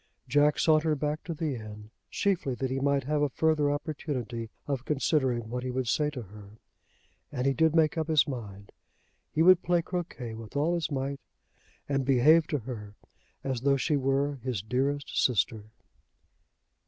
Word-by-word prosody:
Jack 145 +3 +3
sauntered 155 -2 +3
back 150 +1 -2
to 170 - -3
the 155 -2 -2
inn, 105 -1 -9 0.2
chiefly 175 -10 0
that 130 +1 -3
he 135 - -1
might 140 0 +1
have 150 +2 0
a 145 - +2
further 155 0 +2
opportunity 140 -6 -4 0.2
of 135 -3 -2
considering 135 -5 0
what 125 +2 -4
he 130 - -4
would 125 0 -2
say 150 +5 +1
to 130 -5 -6
her. 105 +1 -14 0.7
And 125 - -2
he 135 - +3
did 160 +2 +2
make 160 0 +3
up 160 - -1
his 155 -6 +4
mind. 100 -7 -7 0.6
He 160 - +2
would 185 +1 +7
play 175 -1 +1
croquet 165 -10 -5
with 110 +3 -10
all 155 +4 +2
his 170 -3 -1
might, 140 -1 -3 0.7
and 135 -1 0
behave 150 +5 +5
to 150 - 0
her 105 -5 -8 0.5
as 130 -3 -2
though 140 +1 +3
she 150 +3 +1
were 140 +1 0
his 125 -6 -3
dearest 135 +5 -1
sister. 110 -3 +1
135 Hz, 170 wpm, -28 LUFS, 125-150 Hz, 0.7 s, would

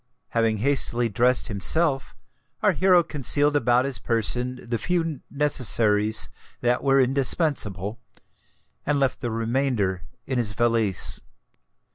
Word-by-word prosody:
Having 115 -2 0
hastily 120 -1 0
dressed 125 +4 +2
himself, 135 - +1 0.5
our - - +5
hero 185 -2 +3
concealed 145 0 0
about 125 -3 +2
his 140 -2 -4
person 125 +2 -2
the 115 -1 -2
few 165 -5 -2
necessaries 110 -7 +2 0.3
that 120 +1 0
were 135 0 +3
indispensable, 125 - 0 0.8
and 145 -1 0
left 135 -2 0
the 120 - -3
remainder 115 -4 -1 0.2
in 130 -2 -2
his 105 -4 -3
valise. 115 -4 +1
125 Hz, 115 wpm, -24 LUFS, 115-140 Hz, 0.8 s, our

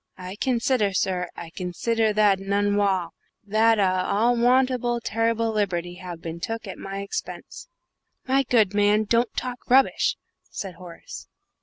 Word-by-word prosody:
I 185 +1 -7
consider, 235 -3 +1
sir, 185 -1 -1
I 165 -1 -9
consider 215 +6 -1
that 205 -2 +3
a - - -9
unwall 200 -2 +1 0.4
that 220 +2 +3
a 185 -2 +1 0.3
most - - -2 0.3
unwarrant 240 -1 -2
terrible 230 0 0
liberty 180 -4 -2
have 175 -2 -8
bin 165 0 -6
took 225 +5 -4
at 195 - -8
my 195 0 -5
expense." 200 - -7 0.6
"My 270 +1 +3
good 225 -6 +2
man, 205 +1 +3
don't 230 +3 +1
talk 250 -1 -4
rubbish!" 265 +2 +3 0.3
said 195 -2 -6
Horace. 175 -1 -11
205 Hz, 145 wpm, -24 LUFS, 185-230 Hz, 0.6 s, that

